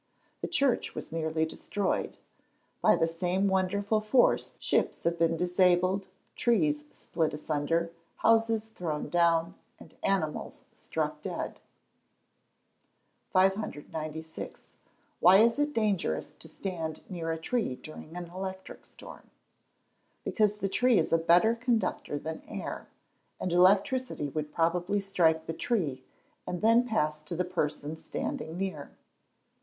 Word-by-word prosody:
The - - -2
church 280 -7 +1
was - - -6
nearly 160 -1 0
destroyed. 195 +4 -2 0.6
By - - +6
the 165 - +2
same 180 +4 0
wonderful 200 +3 +1
force, 240 +4 +3
ships - - 0
have 170 0 0
been 165 0 +2
disabled, 180 +2 +2 0.3
trees 155 -11 +2
split 160 -3 -2
asunder, 155 +3 -1 0.2
houses 225 -1 +3
thrown 160 -8 -4
down, 170 0 +3 0.3
and - - -15
animals 180 -6 -1
struck - - -3
dead. - - -4 1.7
596. 160 -5 -2 0.5
Why 185 +2 +8
is 230 +5 +4
it 290 0 +2
dangerous 205 - 0
to - - -12
stand 165 -5 -5
near 165 -3 -3
a 165 - -2
tree 205 - -1
during 155 +4 -10
an 175 -1 -7
electric 190 0 -7
storm? - - -13 0.9
Because 210 -2 +1
the 200 - -1
tree 245 +4 +3
is - - +1
a 165 - +5
better 175 +7 +5
conductor 235 - -1
than 160 +2 -5
air, - - -6 0.5
and 180 - -2
electricity 195 - +3
would 150 +1 -4
probably 175 +5 +1
strike 170 -5 +2
the 165 - -3
tree, 155 - -1 0.4
and 180 +1 -4
then 230 +2 +5
pass 155 -9 0
to 155 +3 -6
the 180 +2 0
person 155 -3 -2
standing 160 +1 -4
near. 185 -7 -4
180 Hz, 125 wpm, -29 LUFS, 160-205 Hz, 1.7 s, Why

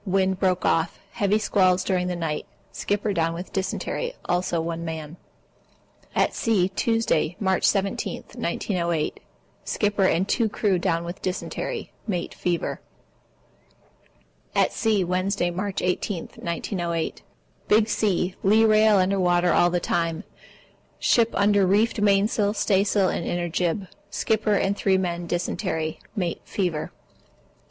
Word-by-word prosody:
Wind 190 -1 +1
broke 185 -2 +1
off. 165 0 +1
Heavy 205 -2 +1
squalls 185 -4 +2
during 180 -2 0
the 180 - -2
night. 165 -3 -3 0.2
Skipper 205 0 -1
down 165 -1 0
on 175 +2 -5
dysentery, 340 - -2
also 175 -1 0
one 165 0 -3
man. 160 -1 -5 1.0
At - - +2
sea, 200 -5 +1
Tuesday, 195 -6 +1
March 190 -2 +1
17, 195 -1 0
1908. 170 -5 -1 0.4
Skipper 205 -2 +1
and 185 +1 +2
2 230 0 +1
crew 200 -3 +1
down 170 -2 0
on 175 - -4
dysentery. 185 0 -4 0.2
Mate 180 -5 -2
fever. 175 -2 -2 1.7
At - - +3
sea, 215 -4 +1
Wednesday, 180 0 0
March 190 +2 -3
18, 180 0 -1
1908. 170 -1 -3 0.5
Big 215 +1 +4
sea. 190 -5 0
Lee 215 +3 +5
rail 215 -1 +5
under 190 +1 +2
water 175 -1 +3
all 175 - +4
the 175 0 0
time. 165 +1 -1 0.7
Ship 230 -1 +3
under 200 0 +3
reefed 210 +3 +2
mainsail, 205 +1 +2
staysail, 195 -2 +2
and 170 - -2
inner 175 0 -1
jib. 175 +3 -1 0.2
Skipper 220 -2 +1
and 195 0 +1
3 195 -2 +2
men 175 -2 -2
dysentery. 165 -2 -2 0.2
Mate 180 -5 -2
fever. 175 -6 -2
185 Hz, 130 wpm, -24 LUFS, 175-205 Hz, 1.7 s, Lee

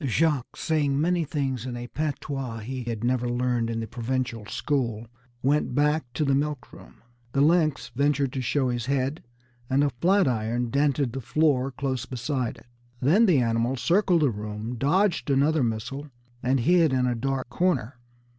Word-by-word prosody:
Jacques, 140 +1 +1
saying 145 -4 +1
many 175 +2 +2
things 135 -5 -2
in 120 -1 -4
a 120 - -5
patois 135 -3 -4
he 125 +2 -5
had 115 -2 -4
never 125 0 +1
learned 120 -1 0
in 115 0 -2
the - - -3
provincial 120 -2 -3
school, 120 -6 -1 0.4
went 140 -1 +1
back 150 -2 +1
to 150 +3 0
the 140 - +2
milk 145 0 -2
room. - - -15 0.3
The 135 - +2
lynx 155 -1 +2
ventured 140 -1 +1
to 135 - -2
show 130 +1 0
his 120 -1 -2
head, 140 +2 -1 0.5
and 135 +2 +3
a 145 - +1
flat 190 -1 +4
iron 120 0 -1
dented 140 -3 +1
the 135 - -4
floor 135 0 +2
close 130 -1 -3
beside 125 0 -2
it. - - -17 0.3
Then 180 - +4
the 175 -6 +5
animal 115 +2 +1
circled 175 +3 +2
the 140 - +3
room, 105 +2 -5
dodged 170 - +1
another 145 +3 +3
missile, 125 +6 -3 0.3
and 130 0 +1
hid 165 0 +4
in 130 -1 +2
a 125 - +1
dark 130 +2 -2
corner. 140 -9 0
135 Hz, 175 wpm, -26 LUFS, 120-150 Hz, 0.5 s, the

